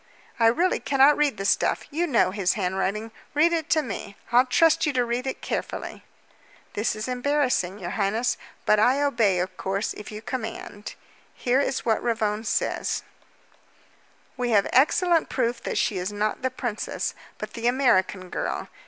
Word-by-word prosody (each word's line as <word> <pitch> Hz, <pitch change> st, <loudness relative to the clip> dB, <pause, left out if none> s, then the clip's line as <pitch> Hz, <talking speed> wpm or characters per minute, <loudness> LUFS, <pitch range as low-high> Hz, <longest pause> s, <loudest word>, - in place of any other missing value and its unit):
"I 230 Hz, -, +5 dB
really 345 Hz, +11 st, +2 dB
cannot 275 Hz, +1 st, +4 dB
read 295 Hz, -2 st, +1 dB
the 195 Hz, -, -4 dB
stuff. -, -, +2 dB
You 340 Hz, +4 st, 0 dB
know 235 Hz, -, +3 dB
his 195 Hz, -1 st, +1 dB
handwriting. 195 Hz, +3 st, -2 dB, 0.2 s
Read 330 Hz, +3 st, +4 dB
it 325 Hz, -1 st, -1 dB
to 310 Hz, -1 st, +3 dB
me. 200 Hz, -3 st, -6 dB
I'll 250 Hz, +2 st, +5 dB
trust 315 Hz, +4 st, +4 dB
you 295 Hz, -, 0 dB
to 250 Hz, -2 st, +2 dB
read 240 Hz, +2 st, -2 dB
It 265 Hz, -, -4 dB
carefully." -, -, -4 dB, 0.7 s
"This 215 Hz, +1 st, -1 dB
is 215 Hz, +2 st, -4 dB
embarrassing, 255 Hz, -7 st, 0 dB
your 175 Hz, -3 st, -5 dB
highness, 215 Hz, +5 st, 0 dB, 0.3 s
but 215 Hz, -, +4 dB
I 250 Hz, +6 st, +4 dB
obey, 225 Hz, -9 st, +2 dB
of 180 Hz, +1 st, -2 dB
course, 195 Hz, +2 st, -2 dB
if 210 Hz, -, -9 dB
you 215 Hz, +1 st, -8 dB
command. 220 Hz, -4 st, -6 dB, 0.4 s
Here 250 Hz, +2 st, +1 dB
is 280 Hz, -, -1 dB
what 225 Hz, -2 st, +2 dB
Ravone 220 Hz, -2 st, -1 dB
says: -, -, -1 dB, 1.3 s
"'We 250 Hz, -1 st, -1 dB
have 205 Hz, -4 st, +3 dB
fresh 330 Hz, +6 st, +3 dB
proof 235 Hz, -2 st, -1 dB
that -, -, -3 dB
she 195 Hz, -, +1 dB
is 180 Hz, +3 st, -3 dB
not 210 Hz, +1 st, -2 dB
the 260 Hz, -, 0 dB
princess, 240 Hz, -4 st, -3 dB, 0.2 s
but -, -, -7 dB
the 235 Hz, 0 st, -2 dB
American 200 Hz, -8 st, +2 dB
girl. -, -, -3 dB
235 Hz, 170 wpm, -25 LUFS, 205-265 Hz, 1.3 s, I